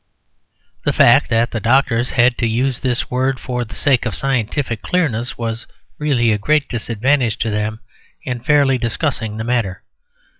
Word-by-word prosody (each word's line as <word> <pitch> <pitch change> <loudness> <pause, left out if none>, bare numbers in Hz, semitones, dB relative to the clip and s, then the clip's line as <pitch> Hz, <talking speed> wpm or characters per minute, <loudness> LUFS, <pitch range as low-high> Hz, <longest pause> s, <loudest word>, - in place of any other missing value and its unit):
The - - +1
fact - - +5
that 115 +1 +1
the 115 - -2
doctors 120 +1 +2
had 120 0 +4
to 120 - +1
use 125 +3 0
this 125 -3 -1
word 130 +1 0
for 125 -1 -3
the 115 - -10
sake 130 -4 +2
of 110 - -3
scientific 130 -2 -1
clearness 130 -10 -1
was 115 0 -4 0.3
really 130 -6 +2
a 105 - 0
great 150 +6 +1
disadvantage 120 +1 0
to 110 - -1
them 105 +1 -2 0.4
in 125 -2 -3
fairly 140 -1 +3
discussing 115 -2 -2
the 110 - -3
matter. 115 -6 -1
120 Hz, 160 wpm, -18 LUFS, 115-135 Hz, 0.4 s, fact